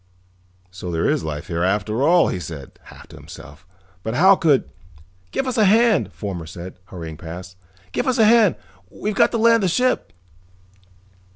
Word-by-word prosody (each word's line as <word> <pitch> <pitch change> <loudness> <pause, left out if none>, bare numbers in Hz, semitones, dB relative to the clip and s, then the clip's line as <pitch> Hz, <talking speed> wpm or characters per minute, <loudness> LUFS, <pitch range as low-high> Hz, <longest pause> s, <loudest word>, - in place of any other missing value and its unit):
"So 90 0 -7
there 80 -1 0
is - - 0
life 75 0 -5
here, 85 -1 -3
after 105 +5 0
all," 170 +4 +4
he 90 - -3
said, 75 -4 -9
half - - -14
to - - -13
himself. 70 +5 -13 0.3
"But 110 +4 -4
how 190 +6 +6
could 150 -7 +2 0.3
" 90 +3 -29
"Give 270 - -2
us 255 -3 -2
a 215 - +5
hand," 210 - +3
Fomar 85 -1 -6
said, 90 +2 -10
hurrying 80 -4 -8
past. 90 +2 -9 0.4
"Give - - -2
us 255 0 +1
a 225 - +5
hand, 220 -4 +5 0.3
we've 210 - -4
got - - +4
to 235 - -2
land 230 0 +4
the 190 - +1
ship!" 250 - 0
100 Hz, 180 wpm, -21 LUFS, -, 0.4 s, how